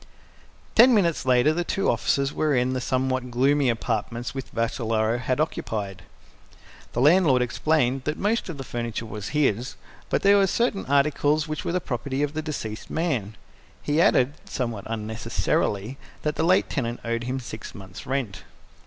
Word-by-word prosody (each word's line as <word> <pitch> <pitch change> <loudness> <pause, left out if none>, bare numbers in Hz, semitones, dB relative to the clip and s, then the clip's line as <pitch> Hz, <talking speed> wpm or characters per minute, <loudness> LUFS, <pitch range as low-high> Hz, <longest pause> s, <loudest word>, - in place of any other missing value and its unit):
Ten 240 +2 +7
minutes 170 -9 +1
later 130 +4 +4
the 175 +2 -1
two 195 +3 -1
officers 140 -1 +1
were 155 -2 +1
in 125 +1 +1
the 130 - -2
somewhat 130 0 -1
gloomy 135 +3 +2
apartments 120 +1 -2
which 135 -1 -5
Vassalaro 115 -1 0
had 130 +1 -1
occupied. 105 - -2 0.9
The 120 - 0
landlord 150 -4 +5
explained 130 0 0
that 150 +1 -1
most 215 0 0
of 165 - -5
the 135 - -5
furniture 120 -2 -4
was 105 -2 -6
his, 130 -5 0 0.3
but - - 0
that 200 - +5
there 200 - +7
were 195 - +4
certain 220 - 0
articles 145 +2 +2
which 155 0 -4
were - - -2
the 180 - +2
property 135 -1 -3
of 145 0 -1
the 155 - -2
deceased 115 -9 -5
man. 130 - -1 0.5
He 150 +2 +2
added, 130 -4 +4
somewhat 120 - -4
unnecessarily, 110 +1 -2 0.2
that 150 0 -1
the - - -1
late 185 +3 +4
tenant 120 -4 -3
owed 115 0 -2
him 130 +2 -2
six 110 -3 -8
months' 95 -2 -10
rent. 130 -7 -3
130 Hz, 170 wpm, -25 LUFS, 115-150 Hz, 0.9 s, Ten